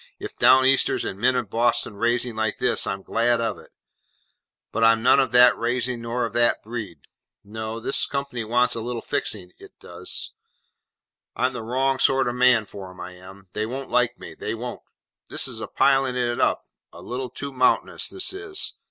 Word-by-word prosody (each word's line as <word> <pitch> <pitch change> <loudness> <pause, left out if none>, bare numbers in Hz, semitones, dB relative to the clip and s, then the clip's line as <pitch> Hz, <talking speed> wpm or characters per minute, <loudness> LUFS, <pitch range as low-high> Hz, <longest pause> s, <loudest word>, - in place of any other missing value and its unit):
If - - -8
Down 130 0 +6
Easters 135 0 +3
and 95 - -5
men 125 +3 +3
of 120 -6 -2
Boston 115 -2 +1
raising 120 +2 0
like 110 -1 -1
this, - - +1
I'm 95 0 -3
glad 120 +1 +1
of 115 -1 -2
it, - - -15 1.0
but 115 - -1
I'm 115 0 +5
none 130 +3 +6
of 130 -3 +1
that 125 0 +7
raising 120 0 -2
nor 120 +1 -2
of 115 - -6
that 120 0 +2
breed. 105 - -6 0.4
No. 110 +2 -6
This 120 - 0
company 140 -4 -3
wants 120 +2 +2
a 115 - -4
little 120 0 -4
fixing, 90 -4 -3
it - - -16
does. - - -5 1.0
I'm 130 +1 0
the 125 - -5
wrong 130 +3 0
sort 135 -1 +3
of 120 - -1
man 125 -3 +4
for 100 -2 -9
'em, 90 0 -14
I 90 0 -7
am. 95 +2 -14
They 110 0 -2
won't 130 +2 -6
like 120 0 +2
me, - - -10
they - - -4
won't. 120 +2 -6 0.5
This - - -2
is - - -6
piling 135 -2 +3
of 125 - +1
it 120 0 -1
up, - - +2 0.3
a - - -12
little 125 +1 -4
too 140 +3 -6
mountainous, 130 0 +1
this 380 0 -3
is. 390 -1 -3
120 Hz, 195 wpm, -24 LUFS, 110-125 Hz, 1.0 s, that